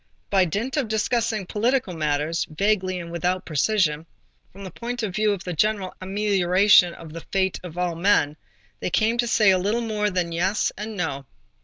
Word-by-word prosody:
By 190 -2 +4
dint 220 - -3
of 275 -5 0
discussing 220 -1 0
political 225 +1 0
matters, 155 +1 -1
vaguely 185 +2 0
and 170 -1 -8
without 180 +2 -1
precision, 160 -1 0 0.4
from 195 +1 -12
the 190 - -7
point 240 +5 -5
of 200 -4 -2
view 215 +1 +2
of 195 -2 -3
the 180 - -4
general 200 +2 0
amelioration 190 -2 +3
of 160 -2 -11
the 165 - -7
fate 190 -1 0
of 175 -1 -9
all 180 -1 0
men, 165 -4 +2 0.4
they - - -2
came 225 +6 +1
to 240 - +2
say 215 -3 +4
a 185 - +3
little 210 +6 0
more 210 -2 -1
than 180 -3 -1
"yes" 185 +5 0
and 210 +1 -6
"no." 140 -6 -3
190 Hz, 185 wpm, -24 LUFS, 170-215 Hz, 0.4 s, By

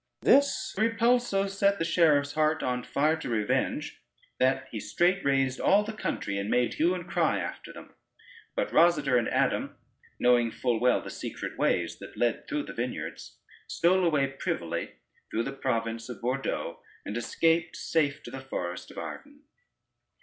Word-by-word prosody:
This 280 +1 +3
repulse 235 +2 +3
so 195 0 +1
set 200 0 +1
the 165 - -1
sheriff's 150 -4 +3
heart 155 +1 +1
on 125 -1 -1
fire 150 +5 +1
to - - -6
revenge, 110 -3 -1 0.4
that 130 0 +2
he 110 - -4
straight 180 - +1
raised 135 -2 +1
all 205 +2 +4
the 220 +1 -5
country, 100 - -3
and 100 +1 -3
made 125 -1 +2
hue 175 +3 +2
and 180 -1 -7
cry 170 -4 +1
after - - -6
them. - - -12 0.6
But - - -1
Rosader 155 -6 +4
and 115 - -1
Adam, - - 0 0.4
knowing 120 -1 +4
full 120 0 -1
well 125 +1 +3
the - - -7
secret - - -6
ways - - 0
that - - -11
led 120 -1 0
through 295 0 -2
the - - -8
vineyards, - - -5 0.3
stole 185 +2 +2
away 150 -5 +3
privily 135 -11 -3 0.4
through 115 - -1
the 135 - -4
province 115 -3 -2
of 120 -5 -7
Bordeaux, 130 +3 -2 0.2
and 105 - -5
escaped 165 +7 +1
safe 155 -2 0
to 120 - -9
the 135 +1 -6
forest 90 -9 -5
of - - -14
Arden. 285 +1 -8
140 Hz, 165 wpm, -28 LUFS, 125-180 Hz, 0.6 s, all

